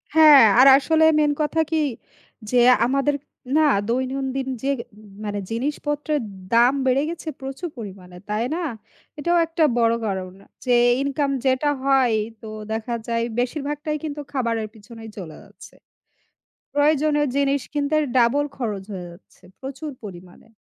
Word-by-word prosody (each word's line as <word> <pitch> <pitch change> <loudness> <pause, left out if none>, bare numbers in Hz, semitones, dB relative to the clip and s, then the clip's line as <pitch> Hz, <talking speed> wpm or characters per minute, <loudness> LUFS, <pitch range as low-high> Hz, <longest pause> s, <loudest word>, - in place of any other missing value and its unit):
হ্যাঁ, 300 -5 +9 0.2
আর 270 - +8
আসলে 320 +3 +2
মেইন 295 -1 +3
কথা 320 +2 +1
কি? 320 - +1 0.7
যে, 250 - +1 0.3
আমাদের 275 +3 +1 0.4
না 310 -1 +4 0.2
দৈনন্দিন 265 +1 -2 0.2
যে 275 - 0 0.6
মানে 205 0 -3
জিনিসপত্রের 295 +3 -2 0.3
দাম 240 +3 +5
বেড়ে 260 +2 +2
গেছে 335 -1 -7
প্রচুর 270 +6 -5
পরিমাণে। 185 -4 -10
তাই 215 +2 0
না? 350 - -3 0.6
এটাও 345 +3 +1
একটা 330 0 -1 0.2
বড় 230 0 +3
কারণ, 185 -2 -4 0.3
যে 245 -1 +3 0.3
ইনকাম 280 0 -1 0.2
যেটা 260 +3 +2
হয় 265 -4 +3 0.3
তো 220 - -9 0.2
দেখা 225 +2 -3
যায় 230 0 0 0.2
বেশিরভাগটাই 295 +3 -2
কিন্তু 295 -1 -4
খাবারের 230 -5 -1
পিছনেই 225 +1 -12
চলে 165 -5 -8
যাচ্ছে। - - -16 1.0
প্রয়োজনীয় 295 0 +2
জিনিস 280 0 +1
কিনতে 295 +1 0 0.2
ডাবল 250 +4 +3
খরচ 210 -7 -4
হয়ে 180 -2 -6
যাচ্ছে 175 +2 -19 0.2
প্রচুর 275 +3 -6
পরিমাণে। 180 +2 -12
270 Hz, 135 wpm, -22 LUFS, 230-295 Hz, 1.0 s, হ্যাঁ